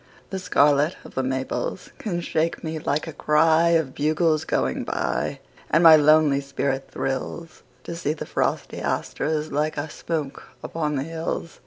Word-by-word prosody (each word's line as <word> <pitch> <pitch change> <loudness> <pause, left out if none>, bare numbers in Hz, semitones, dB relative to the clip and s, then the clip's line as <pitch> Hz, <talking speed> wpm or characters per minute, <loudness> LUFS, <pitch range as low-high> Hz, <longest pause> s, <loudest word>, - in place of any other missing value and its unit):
The 190 - -3
scarlet 145 -2 +3
of - - -12
the 130 - 0
maples 130 - -3
can 175 -5 -2
shake 165 0 -1
me 160 -1 -3
like 150 0 -1
a 160 - -7
cryOf 160 -1 +3
bugles 155 +1 +1
going 65 - 0
by. - - -2 0.3
And 165 +2 +3
my 165 -1 +10
lonely 150 -2 +5
spirit 140 -1 -2
thrillsTo 145 +6 -5
see 155 -3 -1
the 155 - -7
frosty - - -2
asters 155 0 -2
like 150 +2 -1
a 145 +1 -3
smoke 155 -5 -4 0.2
upon 150 -2 -2
the 135 - -1
hills. 165 +1 -5
155 Hz, 150 wpm, -24 LUFS, 140-165 Hz, 0.3 s, my